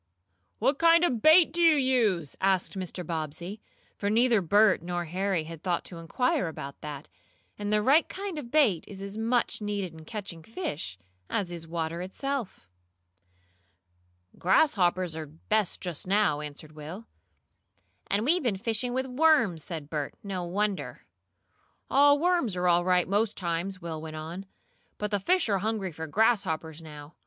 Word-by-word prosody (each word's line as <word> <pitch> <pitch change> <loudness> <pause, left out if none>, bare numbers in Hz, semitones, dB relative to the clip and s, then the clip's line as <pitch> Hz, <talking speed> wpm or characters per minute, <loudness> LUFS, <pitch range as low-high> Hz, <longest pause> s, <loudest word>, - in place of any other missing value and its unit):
"What 270 +5 +1
kind 335 +1 +6
of 250 -10 +1
bait 315 +1 +6
do 345 - 0
you 330 -2 +6
use?" 230 - +1
asked 190 -1 +2
Mr. 185 -2 -5
Bobbsey, 165 +5 -5 0.3
for 200 - -2
neither 230 0 +4
Bert 205 +3 +4
nor 175 0 -3
Harry 185 0 -1
had 160 0 -9
thought 175 -2 -1
to 170 - -8
inquire 185 +3 0
about 140 -3 -7
that, 150 -1 -7 0.5
and 205 0 -2
the 210 0 +2
right 285 +8 +4
kind 385 -4 -5
of 245 -5 -8
bait 235 - +3
is 195 - -9
as 200 +1 -7
much 230 +1 0
needed 205 -4 -3
in 160 -1 -12
catching 200 -6 -6
fish, 160 - -5 0.3
as 185 -4 -1
is 165 -1 -7
water 165 0 -3
itself. 230 - -4 1.7
"Grasshoppers 185 - +2
are 160 -1 -5
best 190 +7 -1
just 175 -2 -6
now," 195 -6 +2
answered 150 +1 -9
Will. 155 +8 -8 1.0
"And 205 +3 0
we've 345 +6 +3
been 235 -8 0
fishing 230 +4 -1
with 260 +1 -1
worms!" 250 - +3
said 160 -5 -6
Bert. 150 -2 -4
"No 190 -3 -3
wonder!" 200 +2 -2 0.9
"Oh, 285 +1 +6
worms 330 - +1
are 180 0 0
all 175 0 +4
right 180 -1 +2
most 205 +3 0
times," 185 +1 -3
Will 160 -2 -5
went 155 -1 -7
on. 165 +5 -7 0.5
"But 210 0 -3
the 205 - +1
fish 360 - +2
are 200 -3 +1
hungry 210 -2 -2
for 160 0 -6
grasshoppers 165 -5 +1
now. 150 -1 -11
195 Hz, 160 wpm, -28 LUFS, 165-230 Hz, 1.7 s, kind